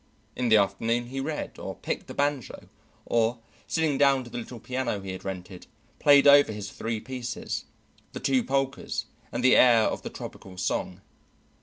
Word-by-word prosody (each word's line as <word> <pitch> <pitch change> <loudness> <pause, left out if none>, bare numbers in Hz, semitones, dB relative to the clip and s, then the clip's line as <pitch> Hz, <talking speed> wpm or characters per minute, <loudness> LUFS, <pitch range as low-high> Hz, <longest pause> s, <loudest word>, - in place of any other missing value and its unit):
In 125 -1 0
the 110 - +7
afternoon 115 +5 0
he 135 +1 -4
read 150 +3 -4
or - - -6
picked - - -4
the - - -8
banjo 145 -3 -2 0.4
or, 115 +1 +1 0.3
sitting 150 +3 0
down 140 -2 +4
to 120 - -12
the 120 - -4
little 120 +1 -8
piano 125 -3 -2
he 95 -1 -6
had 95 - -7
rented, 95 -1 -7 0.3
played 145 -1 +6
over 145 -4 +7
his 105 -1 -6
three 115 -1 -3
pieces, 120 +1 -5 0.5
the - - -5
two 135 -3 +2
polkas 135 0 -1 0.3
and 125 - -3
the 130 - +6
air 120 -3 +7
of - - -1
the - - -6
topical 95 -1 -9
song. 90 0 -2
120 Hz, 175 wpm, -27 LUFS, 105-135 Hz, 0.5 s, the